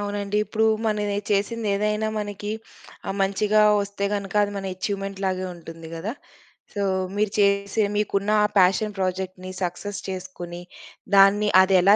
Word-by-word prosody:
అవునండి. 205 0 -2
ఇప్పుడూ 220 0 +1 0.2
మనవే 210 -1 0
చేసిందేదైనా, 210 0 0
మనకి 205 0 -4 0.6
ఆహ్, 195 - -2
మంచిగా 210 +2 +3 0.2
వస్తే 200 0 -4
గనక 200 0 -4
అది 205 0 -1
మన 195 - -4
ఎఛీవ్‌మెంట్‌ 195 0 -4
లాగే 185 0 -1
ఉంటుంది 165 -1 -10
గదా! 190 +8 -4 0.6
సో, 200 -1 -1 0.3
మీరు 210 -1 +1
చేసే 200 +1 +2
మీకున్నఆ 210 0 +1 0.2
పేషన్ 195 +3 +3
ప్రాజెక్ట్‌ని, 185 0 -3
సక్సెస్ 180 +3 -4
చేసుకుని, 175 -2 -6 0.5
దాన్ని 200 +2 +6
అదెలా 190 +1 +5
200 Hz, 125 wpm, -24 LUFS, 190-210 Hz, 0.6 s, దాన్ని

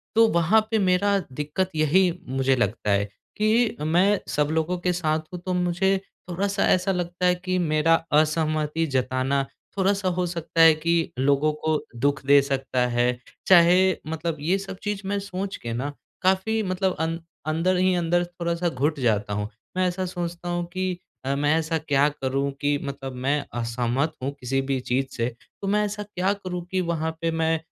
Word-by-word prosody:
तो 225 0 +6
वहाँ 170 +6 +4
पे 225 - +3
मेरा 200 +2 +3
दिक्कत 150 +7 -2
यही 170 +4 +3 0.2
मुझे 135 0 +1
लगता 110 -3 0
है 100 0 +2 0.3
कि 220 +2 +2
मैं 180 +6 +3
सब 150 0 +1
लोगों 160 +3 0
के 180 +1 0
साथ 160 -3 0
हूँ, 180 - -4
तो 185 - -1
मुझे 180 +2 +1 0.3
थोड़ा-सा 195 +3 0
ऐसा 185 +1 +3
लगता 180 0 -2
है 180 0 +4
कि 185 +1 -2
मेरा 155 -1 +2 0.2
असहमति 155 +1 +2
जताना 130 +2 +1 0.3
थोड़ा-सा 195 0 +1
हो 180 - +1
सकता 170 -1 -1
है 165 -1 +9
कि 165 +1 0
लोगों 140 +3 +3
को 155 -1 +1 0.2
दुख 140 +2 0
दे 140 +1 +7
सकता 135 -2 -1
है। 120 0 +1 0.4
चाहे 175 -1 +7 0.3
मतलब 160 +1 -3
ये 170 +6 +1
सब 195 -1 -7
चीज़ 205 -1 -2
मैं 200 +1 0
सोच 195 0 -4
के 115 -1 -5
ना, 130 +5 -2 0.3
काफ़ी 190 +4 +2
मतलब 185 0 0
अं 165 +1 -1 0.3
अंदर 180 +4 +1
ही 185 0 +3
अंदर 175 0 +1
थोड़ा-सा 175 0 -2
घुट 145 +2 -1
जाता 105 -5 +1
हूँ। 105 0 -2 0.3
मैं 185 - +3
ऐसा 185 +1 -2
सोचता 175 -1 -5
हूँ 175 0 -1
कि 185 -1 -1 0.3
अ, 135 +1 0
मैं 145 +2 +2
ऐसा 160 0 0
क्या 145 -2 +2
करूँ 140 -1 -2
कि 145 0 +2
मतलब 135 -2 -5
मैं 145 +1 +1 0.2
असहमत 120 +5 -1
हूँ 135 - -1
किसी 135 +1 -1
भी 135 -1 0
चीज़ 130 +2 0
से 115 - +1 0.4
तो 200 - -3
मैं 210 +1 +2
ऐसा 205 0 -4
क्या 195 -2 -1
करूँ 185 -3 -5
कि 190 -1 +1
वहाँ 165 -2 -1
पे 165 0 0
मैं 160 0 +1
165 Hz, 180 wpm, -25 LUFS, 140-185 Hz, 0.4 s, है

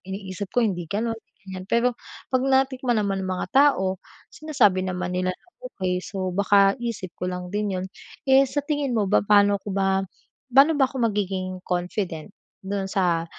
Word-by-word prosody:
iniisip 190 0 -5
ko 245 - +2
hindi 175 -6 -2
ganun, 225 +4 -2
hindi - - -33 0.2
ganyan 185 0 -6
pero 240 +1 +2 0.4
pag 255 - +3
natikman 265 -2 +1
naman 195 -2 -1
ng 185 - -4
mga - - -3
tao, 190 -10 +4 0.3
sinasabi 240 -12 +2
naman 180 -1 -3
nila 185 0 0
na - - -17 0.3
okey, 185 -1 -1
so, 190 -2 -3
baka 200 +1 +4
isip 230 -6 -4
ko 180 - -3
lang 180 0 -6
din 205 -2 -1
yun. 185 - -4 0.4
Eh 265 +1 +7
sa 290 +2 -2
tingin 285 -3 -1
mo 210 -3 +1
ba - - +5
paano 205 -1 +4
ko 205 - -7
ba 195 0 +1 0.5
paano 275 +5 +7
ba 270 - +5
ako 255 -3 0
magiging 185 -2 -3
confident 180 -1 -3 0.3
dun 195 0 -2
sa 175 -4 +1
200 Hz, 180 wpm, -24 LUFS, 185-240 Hz, 0.5 s, Eh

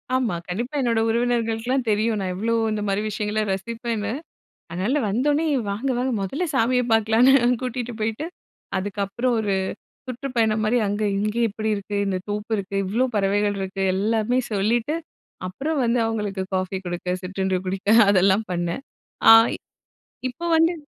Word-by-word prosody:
ஆமா, 245 -8 +1
கண்டிப்பா 240 +10 -4
என்னோட 235 -3 +1
உறவினர்களுக்கெல்லாம் 235 +2 0
தெரியும். 215 +1 +1
நான் 190 -2 -2
எவ்ளோ 225 +5 -1 0.2
இந்த 215 -1 -2
மாரி 200 +1 0
விஷயங்களை 215 0 -1
ரசிப்பேன்னு. 225 +1 -3 0.6
அதனால 190 - 0
வந்தவுடனே 290 +9 +1 0.3
வாங்க 225 +7 -2
வாங்க 255 +1 0
மொதல்ல 270 - -2
சாமிய 250 0 +3
பார்க்கலான்னு, 225 +4 +5 0.3
கூட்டிகிட்டு 250 -1 -3
போயிட்டு. 220 +8 -2 0.5
அதுக்கப்புறம் 205 +5 -1
ஒரு 205 -2 0 0.5
சுற்றுப்பயணம் 235 -4 0
மாரி 230 +3 +2
அங்க 205 +2 -1 0.2
இங்க 210 +2 -1
இப்படி 220 +1 -3
இருக்கு 205 0 -4
இந்த 190 -1 0
தோப்பு 210 +2 -3
இருக்கு, 200 0 -5
இவ்வளோ 225 +7 +1
பறவைகள் 205 0 +1
இருக்கு, 195 0 -3
எல்லாமே 220 +5 +1
சொல்லிட்டு 225 +8 +1 0.5
அப்புறம் 285 +11 -2
வந்து 240 +1 +2
அவங்களுக்கு 210 -4 -2
காஃபி 185 +1 -1
கொடுக்க, 175 +1 -2
சிற்றண்டு 190 0 -1
குடிக்க 195 +2 -3 0.2
அதெல்லாம் 195 +2 +4
பண்ணேன். 175 +8 -2 0.5
ஆ, - - +12 1.0
இப்போ 260 +8 -7
வந்து 330 +2 +4
215 Hz, 140 wpm, -23 LUFS, 195-240 Hz, 1.0 s, ஆ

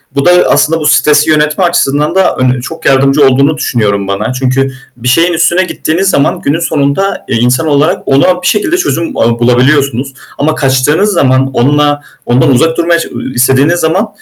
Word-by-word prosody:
Bu 140 - -1
da 175 - +5 0.2
aslında 165 +1 +1
bu 155 - -5
stresi 150 0 +2
yönetme 150 +3 +1
açısından 150 -2 0
da 190 - +1
ön 130 0 0
çok 160 +5 -9
yardımcı 135 +2 +2
olduğunu 140 +4 +1
düşünüyorum 100 -8 -1
bana. 100 +5 -3
Çünkü 130 +1 -1 0.3
bir 125 0 -6
şeyin 165 +8 +2
üstüne 170 +2 +1
gittiğiniz 180 +1 -2
zaman, 140 - 0
günün 145 +4 -1
sonunda, 160 +4 -2
eee, - - -1
insan 125 +7 0
olarak 145 +1 0
ona 160 +7 +2
bir - - -2
şekilde 270 +11 0
çözüm 170 - -3
a 115 0 0
bulabiliyorsunuz 130 +2 +1 0.2
ama 155 +2 -1
kaçtığınız 145 +8 +1
zaman, 135 -4 +1
onunla, 145 +3 +1 0.2
ondan 125 +3 +2
uzak 160 +6 +1
durmaya 170 0 +1
ça - - -5
ııı, - - -7
istediğiniz 135 +7 +1
zaman, 175 +7 0
145 Hz, 175 wpm, -9 LUFS, 130-165 Hz, 0.3 s, da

